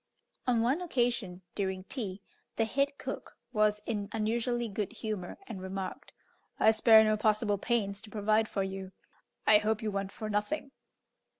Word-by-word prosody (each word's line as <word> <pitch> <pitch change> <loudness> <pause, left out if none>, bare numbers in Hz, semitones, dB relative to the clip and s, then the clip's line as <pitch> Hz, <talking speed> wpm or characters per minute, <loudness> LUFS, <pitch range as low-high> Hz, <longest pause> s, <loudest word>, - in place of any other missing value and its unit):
On 240 -2 +3
one 265 +9 +2
occasion, 235 - -1
during 190 -2 -2
tea, 200 -4 -4 0.3
the 225 - +2
head 280 +5 0
cook - - -6 0.2
was 210 -1 +2
in 205 -3 -2
unusually 235 +2 0
good 205 -1 -3
humour, 210 -5 -4
and 195 - -7
remarked, 190 0 -5 0.5
"I 220 - +7
spare 220 0 +7
no 215 0 +3
possible 210 -1 +2
pains 205 -3 0
to 215 - -12
provide 215 +1 +2
for 195 - 0
you. 190 0 -5 0.5
I 210 -1 +7
hope 215 +1 0
you 215 - 0
want 195 -1 -2
for 215 - -6
nothing." 215 +8 -1
215 Hz, 160 wpm, -31 LUFS, 200-230 Hz, 0.5 s, I